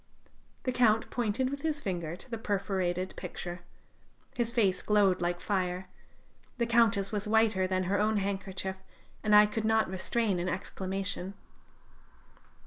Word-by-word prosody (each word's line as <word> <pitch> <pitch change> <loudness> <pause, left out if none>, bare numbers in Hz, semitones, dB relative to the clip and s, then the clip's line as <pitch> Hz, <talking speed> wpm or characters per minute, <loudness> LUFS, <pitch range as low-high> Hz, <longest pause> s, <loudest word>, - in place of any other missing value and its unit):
The 255 - 0
Count 225 -3 +3
pointed 245 +2 0
with 280 0 -4
his 310 -2 -1
finger 175 - -3
to 185 - -12
the 230 - -3
perforated 190 -3 -1
picture; 175 0 -6 0.8
his 235 -1 0
face 200 -7 +2
glowed 200 -4 +3
like 175 0 0
fire; 185 -2 -2 0.7
the 235 - +1
Countess 230 -4 +3
was 210 0 -2
whiter 215 -4 +3
than 185 0 0
her 195 +3 0
own 215 +1 +2
handkerchief; 190 -1 -3 0.4
and 210 -1 +4
I 210 0 +9
could 210 +1 -3
not 220 -3 +2
restrain 195 +1 0
an 180 +1 -1
exclamation. 190 +1 -4
200 Hz, 140 wpm, -30 LUFS, 185-220 Hz, 0.8 s, I